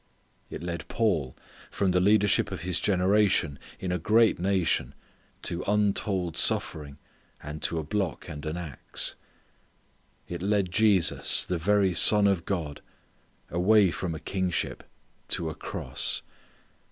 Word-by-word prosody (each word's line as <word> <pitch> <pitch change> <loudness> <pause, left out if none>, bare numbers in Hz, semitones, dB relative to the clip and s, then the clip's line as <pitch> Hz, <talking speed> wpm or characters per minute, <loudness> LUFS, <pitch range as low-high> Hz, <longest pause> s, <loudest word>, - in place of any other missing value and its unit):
It - - -7
led 85 -1 -5
Paul 85 - -1 0.3
from 95 -2 0
the 90 - +2
leadership 100 +1 +3
of 95 -3 -6
his 90 0 -1
generation 95 -6 +2 0.2
in 95 - -3
a 90 - -1
great 110 +5 +3
nation 85 -8 0 0.5
to 85 0 -1
untold 100 -4 0
suffering, 70 -2 +1 0.5
and 75 +1 -7
to 85 - -1
a 80 - -2
block 95 -4 -3
and 75 - -8
an 80 +3 -3
ax. 80 -6 -3 1.1
It 85 -1 -6
led 100 -2 0
Jesus 100 -4 +3
the 90 -2 -2
very 100 +1 +2
Son 105 +4 +6
of 95 -4 +1
God, 80 -7 -4 0.7
away 95 +2 +4
from 85 -1 -4
a - - -7
kingship 90 +1 -2 0.4
to 80 -2 0
a - - -6
cross. - - -3
90 Hz, 135 wpm, -27 LUFS, 80-100 Hz, 1.1 s, Son